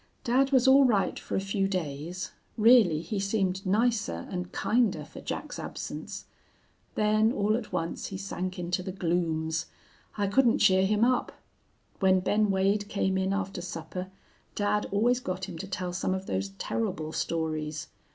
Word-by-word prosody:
"Dad 265 Hz, +2 st, +3 dB
was 260 Hz, -2 st, +4 dB
all 270 Hz, +1 st, +8 dB
right 220 Hz, -7 st, +2 dB
for -, -, -5 dB
a -, -, +2 dB
few 195 Hz, 0 st, 0 dB
days. 175 Hz, -1 st, -4 dB, 0.3 s
Really, 215 Hz, -8 st, +6 dB
he 185 Hz, +5 st, -3 dB
seemed 195 Hz, -2 st, 0 dB
nicer 210 Hz, -, +1 dB
and 180 Hz, 0 st, -4 dB
kinder 230 Hz, -3 st, +1 dB
for -, -, -11 dB
Jack's -, -, -5 dB
absence. -, -, -6 dB, 0.7 s
Then 215 Hz, +1 st, +3 dB
all 215 Hz, -4 st, +1 dB
at 230 Hz, -2 st, -4 dB
once 165 Hz, 0 st, -3 dB
he 190 Hz, -, -5 dB
sank 185 Hz, -1 st, -4 dB
into 180 Hz, +1 st, -1 dB
the 190 Hz, +1 st, -5 dB
glooms. 165 Hz, -3 st, -1 dB, 0.5 s
I 205 Hz, -, +1 dB
couldn't 230 Hz, +4 st, +4 dB
cheer 190 Hz, 0 st, +4 dB
him 210 Hz, +2 st, +2 dB
up. 255 Hz, 0 st, +1 dB, 0.7 s
When 190 Hz, -1 st, +4 dB
Ben 210 Hz, +3 st, +2 dB
Wade 200 Hz, +2 st, +1 dB
came 190 Hz, -2 st, 0 dB
in 190 Hz, 0 st, 0 dB
after 195 Hz, -2 st, -2 dB
supper 180 Hz, +2 st, -6 dB, 0.5 s
dad 210 Hz, 0 st, +1 dB
always 240 Hz, +5 st, +3 dB
got 185 Hz, -5 st, -4 dB
him 170 Hz, -4 st, -8 dB
to 195 Hz, -, -5 dB
tell 185 Hz, -2 st, -3 dB
some 185 Hz, +1 st, 0 dB
of 190 Hz, 0 st, -5 dB
those 95 Hz, -, -2 dB
terrible 115 Hz, +10 st, -2 dB
stories. 155 Hz, -2 st, -2 dB
190 Hz, 160 wpm, -28 LUFS, 175-210 Hz, 0.7 s, all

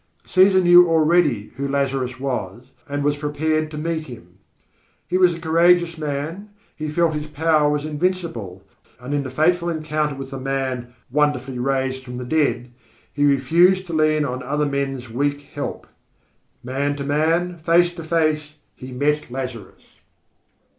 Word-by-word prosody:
Caesar 190 Hz, 0 st, +5 dB
knew 175 Hz, -1 st, +7 dB
already 155 Hz, -9 st, +2 dB
who 140 Hz, 0 st, -2 dB
Lazarus 135 Hz, -2 st, -1 dB
was, 130 Hz, -2 st, -4 dB, 0.2 s
and 145 Hz, 0 st, -2 dB
was 145 Hz, 0 st, +1 dB
prepared 155 Hz, +1 st, -1 dB
to 155 Hz, -, -8 dB
meet 160 Hz, 0 st, -2 dB
him. 95 Hz, -, -13 dB, 0.7 s
He -, -, -2 dB
was 180 Hz, -2 st, +4 dB
a -, -, -9 dB
courageous 170 Hz, +1 st, +3 dB
man; 155 Hz, +6 st, -4 dB, 0.3 s
he 155 Hz, -1 st, -4 dB
felt 165 Hz, +1 st, +1 dB
his 150 Hz, 0 st, -4 dB
power 155 Hz, 0 st, +2 dB
was 150 Hz, 0 st, -1 dB
invincible, 150 Hz, -, -3 dB, 0.4 s
and 125 Hz, +4 st, -6 dB
in 145 Hz, -, +1 dB
the 135 Hz, -, -5 dB
fateful 170 Hz, +6 st, +1 dB
encounter 155 Hz, -2 st, -2 dB
with 135 Hz, 0 st, -8 dB
the 135 Hz, -, -5 dB
man 130 Hz, -2 st, -3 dB, 0.2 s
"wonderfully 135 Hz, -3 st, 0 dB
raised 130 Hz, 0 st, -1 dB
from 125 Hz, -1 st, -8 dB
the 125 Hz, -, -5 dB
dead" 125 Hz, -4 st, 0 dB, 0.4 s
he 145 Hz, 0 st, +1 dB
refused 170 Hz, +8 st, +3 dB
to 170 Hz, -, -7 dB
lean 155 Hz, -1 st, +2 dB
on 130 Hz, -1 st, -4 dB
other 150 Hz, +4 st, -1 dB
men's 135 Hz, -2 st, -2 dB
weak 145 Hz, +5 st, -1 dB
help. -, -, -5 dB, 0.8 s
Man 140 Hz, +3 st, -1 dB
to 140 Hz, -, -5 dB
man, 165 Hz, +5 st, 0 dB
face 175 Hz, +2 st, +3 dB
to 170 Hz, -1 st, -8 dB
face, 155 Hz, -2 st, 0 dB, 0.2 s
he 130 Hz, 0 st, -10 dB
met 145 Hz, +3 st, 0 dB
Lazarus. 125 Hz, -5 st, -7 dB
150 Hz, 155 wpm, -21 LUFS, 135-165 Hz, 0.8 s, knew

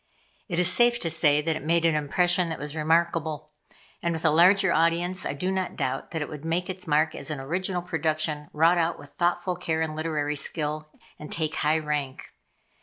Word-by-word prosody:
It 170 Hz, -, -2 dB
is 180 Hz, -1 st, +3 dB
safe 240 Hz, 0 st, +3 dB
to 165 Hz, -, 0 dB
say 150 Hz, -2 st, +3 dB
that 160 Hz, 0 st, 0 dB
it 155 Hz, -, -6 dB
made 165 Hz, +2 st, +2 dB
an 165 Hz, -, +4 dB
impression 175 Hz, +4 st, +2 dB
that 160 Hz, -, -4 dB
was 150 Hz, +2 st, -5 dB
remarkable, 160 Hz, -1 st, 0 dB, 0.5 s
and 170 Hz, 0 st, 0 dB
with 160 Hz, 0 st, -4 dB
a 155 Hz, -, +5 dB
larger 185 Hz, +4 st, +5 dB
audience 170 Hz, +3 st, +1 dB
I -, -, -2 dB
do 180 Hz, +7 st, -2 dB
not 190 Hz, -1 st, -2 dB
doubt -, -, -3 dB
that 160 Hz, -3 st, -3 dB
it -, -, -6 dB
would 150 Hz, -1 st, -9 dB
make 170 Hz, +3 st, -1 dB
its 185 Hz, -1 st, -7 dB
mark 155 Hz, +1 st, +2 dB
as -, -, -6 dB
an 150 Hz, -3 st, -4 dB
original 180 Hz, +6 st, -2 dB
production 155 Hz, -3 st, -1 dB
wrought 165 Hz, +3 st, +3 dB
out 165 Hz, 0 st, 0 dB
with 145 Hz, -, -13 dB
thoughtful 175 Hz, +1 st, 0 dB
care 160 Hz, -2 st, -2 dB
and 155 Hz, -1 st, -2 dB
literary 155 Hz, -2 st, -2 dB
skill, 150 Hz, +1 st, -3 dB, 0.3 s
and 150 Hz, -, -9 dB
take 160 Hz, -1 st, -1 dB
high 155 Hz, +1 st, +2 dB
rank. 150 Hz, -4 st, -3 dB
160 Hz, 205 wpm, -26 LUFS, 150-175 Hz, 0.5 s, a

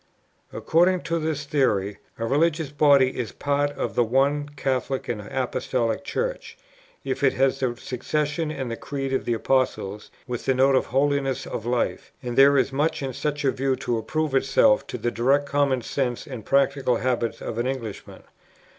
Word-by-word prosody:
According 175 Hz, +2 st, +2 dB
to 170 Hz, 0 st, -1 dB
this 155 Hz, -2 st, -2 dB
theory, 105 Hz, -9 st, 0 dB, 0.2 s
a 115 Hz, -, -2 dB
religious 150 Hz, +3 st, +1 dB
body 140 Hz, -3 st, +4 dB
is 120 Hz, -, -3 dB
part 145 Hz, 0 st, 0 dB
of -, -, -3 dB
the 120 Hz, -, +3 dB
One 140 Hz, +5 st, +1 dB
Catholic 135 Hz, -2 st, -2 dB
and 110 Hz, -3 st, -3 dB
Apostolic 125 Hz, 0 st, -2 dB
Church, 470 Hz, -, -4 dB, 0.5 s
if 135 Hz, 0 st, -3 dB
it 135 Hz, -, +4 dB
has 135 Hz, +1 st, +1 dB
the 125 Hz, -3 st, -1 dB
succession 150 Hz, +5 st, -2 dB
and 130 Hz, -5 st, -4 dB
the -, -, -2 dB
creed 135 Hz, +1 st, -4 dB
of 130 Hz, -, -1 dB
the 120 Hz, -, +1 dB
Apostles, 110 Hz, -5 st, -1 dB, 0.2 s
with 125 Hz, -3 st, -5 dB
the 130 Hz, -, +2 dB
note 135 Hz, +2 st, +4 dB
of 130 Hz, -, +2 dB
holiness 135 Hz, 0 st, 0 dB
of 115 Hz, -, -5 dB
life; 120 Hz, 0 st, -1 dB
and 120 Hz, -1 st, -4 dB
there 140 Hz, +2 st, +6 dB
is 135 Hz, -, +1 dB
much 155 Hz, +2 st, 0 dB
in 135 Hz, -1 st, -3 dB
such 145 Hz, +2 st, -2 dB
a 135 Hz, -, +4 dB
view 135 Hz, 0 st, 0 dB
to 120 Hz, -2 st, -2 dB
approve 155 Hz, +6 st, -2 dB
itself 135 Hz, -, +3 dB
to -, -, -5 dB
the 120 Hz, +1 st, -1 dB
direct 135 Hz, +5 st, +2 dB
common 140 Hz, -3 st, +1 dB
sense 125 Hz, -2 st, -2 dB
and 130 Hz, -7 st, -8 dB
practical 135 Hz, -2 st, +2 dB
habits 120 Hz, -2 st, -1 dB
of 115 Hz, -, -5 dB
an 120 Hz, -, 0 dB
Englishman. 120 Hz, -6 st, -6 dB
135 Hz, 180 wpm, -24 LUFS, 125-145 Hz, 0.5 s, there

